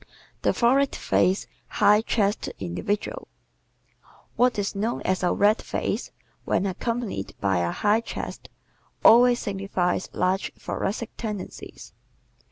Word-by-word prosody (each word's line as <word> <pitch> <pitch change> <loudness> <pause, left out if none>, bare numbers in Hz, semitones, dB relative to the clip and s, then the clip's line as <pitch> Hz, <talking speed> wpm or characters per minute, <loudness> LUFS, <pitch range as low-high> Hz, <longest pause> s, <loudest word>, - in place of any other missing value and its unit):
The - - +3
Florid 265 +3 +2
Faced, 185 +3 +1 0.2
High 210 +1 +4
Chested 210 -2 -1
Individual 150 - -3 0.8
¶ - - -23 0.3
What 250 -2 +3
is 200 -1 -1
known 215 +4 -2
as 185 0 0
a 180 - +2
"red 210 +2 +3
face," - - -3 0.3
when - - 0
accompanied 205 - -3
by 95 -3 +1
a 85 0 0
high 210 - +2
chest, - - -7 0.6
always 245 +1 +7
signifies 195 -4 -2
large 185 +2 0
thoracic 215 +3 -3
tendencies. 210 -4 -7
205 Hz, 120 wpm, -25 LUFS, 185-230 Hz, 0.8 s, always